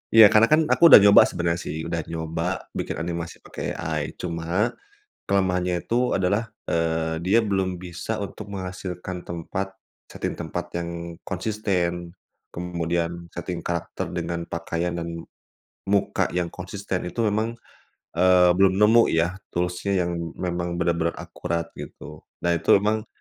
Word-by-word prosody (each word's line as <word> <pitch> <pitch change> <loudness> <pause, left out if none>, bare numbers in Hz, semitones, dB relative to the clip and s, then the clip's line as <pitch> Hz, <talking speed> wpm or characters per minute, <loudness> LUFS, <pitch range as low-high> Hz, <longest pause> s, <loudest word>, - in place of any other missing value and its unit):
Iya, 110 -2 +10
karena 110 +2 +6
kan, 155 +1 +5
aku 170 - +7
udah 135 - +11
nyoba 100 0 +8
sebenarnya 85 0 -1
sih, 80 -3 -4
udah 85 - -2
nyoba, 80 +2 -3
bikin - - -3
animasi 85 0 -5
pakai - - -5
AI. 75 -3 -3
Cuma, 85 +5 -1 0.5
kelemahannya 90 -2 +1
itu, 125 +2 +2
adalah, 100 +4 0 0.2
eee, 80 -1 0
dia 105 +5 +4
belum 95 -4 -1
bisa 90 +5 -4
untuk 100 +1 -7
menghasilkan 90 -1 -5
tempat 95 +3 -4 0.4
setting - - -3
tempat - - -4
yang 85 0 -5
konsisten, 90 -4 -2 0.4
kemudian, 85 0 -2
setting 85 0 -5
karakter 85 0 -3
dengan 85 -1 -3
pakaian, 85 +1 -3
dan, 85 0 -5 0.6
muka 100 0 +1
yang 90 -1 0
konsisten. 95 0 -4
Itu, 110 +4 0
memang, 110 +3 0 0.7
eee, 90 0 +6
belum 95 -1 +5
nemu 115 +2 +6
ya, 85 +3 +1 0.2
tools-nya, 90 +3 -1
yang 85 - -1 0.2
memang, 85 -1 -2
benar-benar 85 -1 +1
akurat, 85 -1 -4
gitu. 75 -1 -10 0.2
Nah, 85 - +2
itu 80 - +4
memang, 110 +1 0
90 Hz, 135 wpm, -24 LUFS, 85-100 Hz, 0.7 s, udah